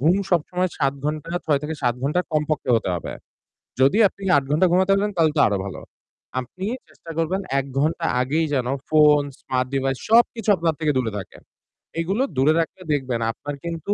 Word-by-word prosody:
ঘুম 160 +7 +4 0.2
সবসময় 180 +1 +1
৭ 135 -2 +2
ঘণ্টা, 155 +1 -3
৬ 145 -3 +2
থেকে 155 +2 -3
৭ 120 -2 +2
ঘণ্টা 150 +6 +1
কমপক্ষে 150 -4 -1
হতে 110 - -2
হবে। 85 - -5 0.7
যদি 135 +10 +4
আপনি 195 +1 -13
৮ 140 - +1
ঘণ্টা 175 +5 +4
ঘুমাতে 185 +2 +3
পারেন 205 +1 0
তাহলে 160 -2 +4
তো - - +5
আরও 100 - 0
ভালো। 100 - -6 0.6
আপনি 180 +10 -6 0.2
চেষ্টা 165 - -12
করবেন 175 +4 0 0.2
১ 135 - -3
ঘণ্টা 155 +3 0 0.2
আগেই 155 +6 +1
যেন 125 -3 0 0.2
phone, 150 -2 +5
smart 130 0 -1
device 135 -1 -1
সবকিছু 230 -1 +3
আপনার 165 -2 0
থেকে 155 -2 +1
দূরে 120 -4 0
থাকে। 95 - -8 0.6
এগুলো 195 +10 0
দূরে 140 +4 +4
রাখলে 165 +3 -3
দেখবেন 130 -4 -1
আপনার 145 +5 -7
কিন্তু 170 +4 -3
155 Hz, 180 wpm, -23 LUFS, 135-175 Hz, 0.7 s, তো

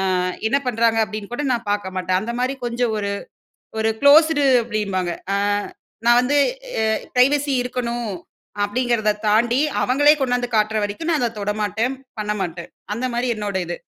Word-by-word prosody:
ஆ - - +1 0.3
என்ன 275 - +3
பண்றாங்க 230 -1 +2
அப்பிடின்னு 215 0 -7
கூட 290 +3 -2
நான் 235 -2 -4
பார்க்க 190 -2 -3
மாட்டேன். 185 0 0
அந்தமாரி 245 +5 -2
கொஞ்சம் 235 -1 -1
ஒரு, 200 0 -2 0.7
ஒரு 220 0 +2
குளோஸ்டு 290 0 +6 0.2
அப்பிடீம்பாங்க. 200 -6 -2 0.2
அ - - +2 0.7
நான் 240 +1 +6
வந்து 275 +4 0 0.5
அ - - +1 0.3
பிரைவசி 280 +3 +3
இருக்கணும் 240 -2 -3 0.5
அப்பிடிங்கிறத 225 0 +1 0.2
தாண்டி 235 +4 +3 0.2
அவங்களே 285 +7 +5
கொண்டாந்து 245 -2 0
காட்டுற 215 +1 +2
வரைக்கும் 205 +12 -3
நான் 305 - +1
அத 235 -1 0
தொடமாட்டேன். 210 +5 -1 0.2
பண்ணமாட்டேன். 190 -5 -3 0.2
அந்தமாரி 245 +1 -2
என்னோட 205 -2 -4
இது. 175 +1 -4
235 Hz, 145 wpm, -21 LUFS, 210-250 Hz, 0.7 s, குளோஸ்டு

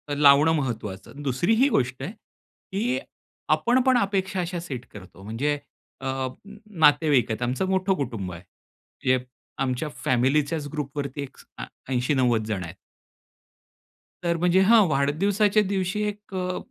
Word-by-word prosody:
लावणं 145 +2 +6
महत्वाचं. 115 -3 -4
दुसरी 140 - +1
ही 275 - +5
गोष्ट 125 - 0
आहे 165 - -4
की 225 +2 -5 0.6
आपण 250 +2 +2
पण 260 -1 +5
अपेक्षा 195 -3 0
अशा 175 0 -3
सेट 135 -8 -6
करतो 95 -2 -12
म्हणजे 130 +8 -1 0.4
अ, 130 0 -2 0.6
नातेवाईक 145 -6 +4
आहेत. 110 - -3
आमचं 125 +10 -1
मोठं 190 0 +2
कुटुंब 115 -9 -4
आहे 85 - -9
म्हणजे 130 +6 -4 0.4
आमच्या 130 +4 -2 0.2
फॅमिलीच्याच 145 +4 +1
ग्रुपवरती 145 -1 -4
एक 135 - -11 0.2
अ, - - -5 0.3
80-90 125 -3 +2
जण 100 -4 -2
आहेत. 85 - -8 1.5
तर, 170 -1 +1
म्हणजे 180 +2 +3
हां 225 -3 +7
वाढदिवसाच्या 195 +9 +2
दिवशी 195 +1 -1
एक 210 -1 -7
अ, 185 0 -2
145 Hz, 135 wpm, -25 LUFS, 125-190 Hz, 1.5 s, हां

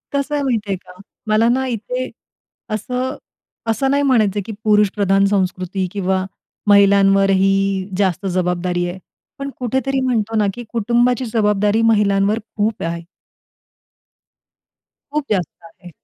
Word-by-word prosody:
कसं 280 +1 -1
आहे 285 - 0
माहिती 220 -6 -1
आहे 190 - 0
का, 180 +1 -16 0.3
मला 215 +2 +3
ना 265 +2 +1
इथे 250 +2 -3 0.6
असं, 250 +5 -3 0.5
असं 270 +5 0
नाही 285 +1 +2
म्हणायचं 215 -7 +2
की 225 - -6
पुरुष 210 -1 +4
प्रधान 195 -1 +3
संस्कृती 185 -1 -1
किंवा 190 -1 -1 0.4
महिलांवरही 195 -1 +4
जास्त 190 -1 0
जबाबदारी 180 -1 -1
आहे. 185 +2 -7 0.4
पण 275 0 -4
कुठेतरी 265 +2 -1
म्हणतो 225 -4 0
ना 210 - +3
की 240 - -8
कुटुंबाची 240 +2 +1
जबाबदारी 210 0 +2
महिलांवर 205 0 +2 0.2
खूप 215 0 0
आहे. 170 0 -3 2.1
खूप 300 -1 -1
जास्त 180 -5 -2
आहे. 165 +2 -14
205 Hz, 125 wpm, -19 LUFS, 195-240 Hz, 2.1 s, पुरुष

